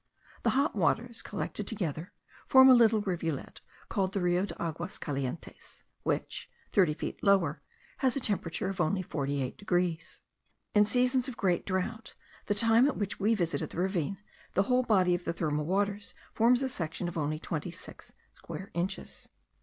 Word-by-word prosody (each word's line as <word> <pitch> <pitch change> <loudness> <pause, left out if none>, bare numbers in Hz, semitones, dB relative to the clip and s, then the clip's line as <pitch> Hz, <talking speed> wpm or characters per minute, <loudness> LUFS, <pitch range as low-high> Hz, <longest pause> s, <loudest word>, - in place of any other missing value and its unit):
The - - +2
hot 280 -1 +2
waters, 225 +6 +1
collected - - -4
together, 175 - -3 0.4
form 260 0 +8
a - - +10
little 225 -3 +5
rivulet, 170 -7 -3 0.3
called 195 -3 -1
the 200 - 0
Rio 180 +2 +1
de - - -8
Aguas 170 +1 -3
Calientes, 140 +1 -5 0.2
which, - - -2 0.2
thirty 180 -7 +4
feet - - -5
lower, 200 -2 +3 0.4
has 260 -4 +2
a - - +1
temperature 195 -8 -1
of 190 -1 -2
only 185 +3 +1
48 140 -5 -3
degrees. 175 -4 -1 0.5
In 210 0 +6
seasons 250 +3 +2
of 255 - -6
great 180 -4 +1
drought, 190 +4 -3 0.3
the 205 - +1
time 230 +4 +5
at 290 - -1
which 205 -1 -3
we 215 +3 +3
visited 170 -5 -1
the - - -10
ravine, 185 0 0 0.4
the 195 - +4
whole 250 +4 +3
body 190 -7 +3
of 175 0 -1
the 170 - -2
thermal 150 -2 -1
waters 200 +2 -1 0.2
forms 245 +3 +4
a - - +1
section 170 -6 -3
of 175 - -5
only 155 -1 -1
twenty 160 +1 -4
six 170 +2 -10 0.2
square 195 +3 -8
inches. 185 +3 -4
190 Hz, 170 wpm, -30 LUFS, 170-220 Hz, 0.5 s, a